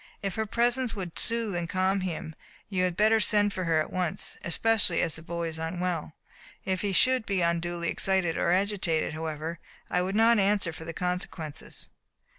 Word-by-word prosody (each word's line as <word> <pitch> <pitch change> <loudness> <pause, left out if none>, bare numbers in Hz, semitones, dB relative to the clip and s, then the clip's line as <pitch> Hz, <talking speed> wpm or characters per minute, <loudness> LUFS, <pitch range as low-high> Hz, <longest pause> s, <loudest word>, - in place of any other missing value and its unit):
If 195 -2 -1
her 220 0 -2
presence 240 +2 +1
would 180 -4 -4
soothe 230 -3 0
and 170 -1 -2
calm 190 +2 +1
him 170 -3 -4 0.4
you 185 -2 +1
had 180 -1 -2
better 220 +1 +5
send 205 -1 +3
for 185 -2 -3
her 165 -1 +3
at 155 - -3
once, 180 -3 0
especially 195 +2 +2
as 165 - +1
the 160 - -5
boy 170 +1 -3
is 160 0 -6
unwell. 165 -1 -3 0.5
If 185 -1 -1
he 205 - 0
should 255 +5 +3
be 195 -3 -1
unduly 170 0 0
excited 190 -4 +1
or - - +1
agitated, 185 -5 +1
however, 160 +1 -4 0.3
I 180 - +2
would 190 +2 -2
not 225 +1 +5
answer 200 -3 +2
for 160 - -8
the 165 - -4
consequences." 180 -3 -4
180 Hz, 185 wpm, -28 LUFS, 165-205 Hz, 0.5 s, better